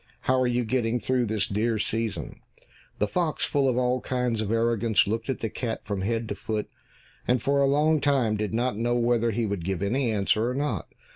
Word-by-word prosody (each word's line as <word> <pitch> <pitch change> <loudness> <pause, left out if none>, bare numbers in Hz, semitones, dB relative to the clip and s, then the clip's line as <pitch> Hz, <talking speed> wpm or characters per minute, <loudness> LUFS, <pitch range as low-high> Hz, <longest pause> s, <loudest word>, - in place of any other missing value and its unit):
How 130 0 +2
are 125 - +2
you 120 0 0
getting 120 0 0
through 125 -1 0
this 105 -1 0
dear 110 +3 0
season?" 110 0 -3 0.6
The 105 - +1
fox, 165 +3 0
full 140 -2 +2
of 125 - 0
all 125 0 +1
kinds 125 -3 -1
of 105 -1 -2
arrogance, 115 -1 +2
looked 115 +5 -3
at 135 - 0
the 110 - -1
cat 115 0 -3
from 100 -3 -3
head 115 +3 -1
to - - -1
foot, 105 +1 -3 0.6
and 125 +1 +3
for 140 +2 +1
a 140 - +4
long 150 +3 +3
time 135 -6 +2
did 105 -1 -2
not 120 +1 0
know 120 +3 0
whether 120 -1 +2
he 115 +1 0
would 100 -4 -3
give 95 +1 -2
any 120 +4 +1
answer 110 +2 +1
or 125 - -3
not. 145 +2 -2
115 Hz, 215 wpm, -26 LUFS, 110-125 Hz, 0.6 s, a